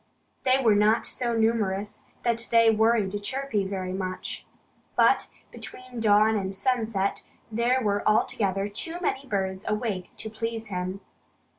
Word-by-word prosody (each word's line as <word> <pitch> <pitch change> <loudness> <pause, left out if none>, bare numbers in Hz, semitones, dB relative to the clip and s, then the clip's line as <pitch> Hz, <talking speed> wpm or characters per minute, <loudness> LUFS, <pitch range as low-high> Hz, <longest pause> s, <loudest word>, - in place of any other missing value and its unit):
They 260 0 +5
were 235 -5 +4
not 210 +2 +3
so 240 -2 -2
numerous 210 -3 0 0.2
that 235 -1 0
they 230 -1 +6
worried 220 -2 +3
Chirpy 255 -3 -1
very 185 -2 -3
much. 185 -1 -5 0.5
But - - +4 0.2
between 255 -1 -7
dawn 215 0 +4
and 195 -2 -2
sunset 220 -2 0 0.3
there 235 +3 +2
were 205 -1 +1
altogether 200 -2 +1
too 325 +12 -2
many 275 -6 -2
birds 190 -3 -2
awake 210 -4 -2
to - - -5
please 225 0 -4
him. 185 +1 -3
215 Hz, 135 wpm, -26 LUFS, 195-235 Hz, 0.5 s, they